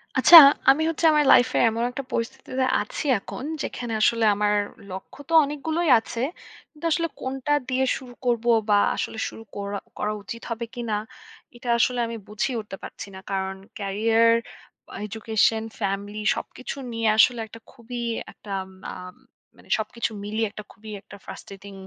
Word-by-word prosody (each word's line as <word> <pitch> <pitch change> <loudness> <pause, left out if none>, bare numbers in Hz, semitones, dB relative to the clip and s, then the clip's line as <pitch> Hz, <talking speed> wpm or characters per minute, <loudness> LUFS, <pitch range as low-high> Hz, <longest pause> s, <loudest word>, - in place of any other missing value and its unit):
আচ্ছা 340 - +10 0.3
আমি 275 +4 +5
হচ্ছে 330 +1 -1
আমার 300 -1 +3
লাইফ 245 - +6
এ - - +4
এমন 230 +1 -2
একটা 275 +2 -5
পরিস্থিতিতে 260 +2 -2 0.2
আছি 210 +8 -5
এখন, 250 - -8 0.2
যেখানে 240 -2 -4
আসলে 230 +1 +3
আমার 210 0 +1 0.4
লক্ষ্য 190 +8 -9
তো - - -3
অনেকগুলোই 310 +3 -2
আছে। 230 +1 -6 0.5
কিন্তু 305 +1 -10
আসলে 335 +1 +1
কোনটা 265 +2 -3 0.2
দিয়ে 260 +1 +1
শুরু 250 -2 -11
করবো 240 -1 +1 0.2
বা 205 - +5 0.2
আসলে - - -4
শুরু 225 - -11
কোরা 200 0 -4 0.2
করা 210 - -1
উচিত 230 +3 -7
হবে 230 0 -3
কিনা 235 -3 -2 0.6
এটা 240 0 -7
আসলে 250 +1 +2
আমি 230 - -5
বুঝেই 215 +5 -2
উঠতে 210 -2 -9
পারছি - - -8
না। - - -8
কারণ 190 0 -2 0.2
ক্যারিয়ার 225 +3 +3 0.7
এডুকেশন, 220 +1 +1 0.2
ফ্যামিলি 205 +1 -3
সবকিছু 255 - -7 0.2
নিয়ে 230 -1 -1
আসলে 240 +2 +5
একটা 230 - -12
খুবই 240 -1 -8 0.3
একটা 205 - -12 0.4
আ - - -7 0.6
মানে - - -20
সবকিছু 225 +1 -3
মিলিয়ে 220 +2 -1
একটা 210 0 -9
খুবই 215 -1 -12
একটা 200 - -13
ফ্রাস্ট্রেটিং 195 0 -10
230 Hz, 155 wpm, -24 LUFS, 210-255 Hz, 0.7 s, আচ্ছা